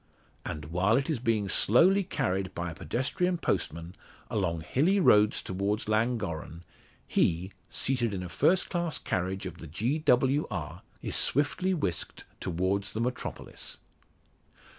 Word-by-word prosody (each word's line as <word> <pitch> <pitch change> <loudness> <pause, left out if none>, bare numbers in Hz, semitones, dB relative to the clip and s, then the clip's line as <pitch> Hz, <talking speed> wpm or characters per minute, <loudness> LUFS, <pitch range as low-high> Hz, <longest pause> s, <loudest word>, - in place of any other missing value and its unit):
And 75 -2 -5
while 95 +7 +3
it 135 +4 0
is 145 - -1
being 115 -4 +1
slowly 180 - +5
carried 95 - -2
by 85 0 -3
a - - -7
pedestrian 140 - -1
postman, 85 - -2 0.4
along 85 -6 0
hilly 165 - +2
roads 105 - +4
towards 100 +3 -2
Llangorren, 105 -8 -1 0.4
he, 90 +3 +1 0.2
seated 125 -4 +1
in 95 -2 -4
a - - -5
first 180 - +2
class 170 -3 -1
carriage 95 +1 -2
of 95 - -7
the 80 - -9
Gr.W.R., 125 - 0 0.2
is - - 0
swiftly 180 +7 +2
whisked 90 - -3 0.2
towards 95 +3 -1
the 110 - -3
metropolis. 125 +1 -4
105 Hz, 130 wpm, -29 LUFS, 90-135 Hz, 0.4 s, slowly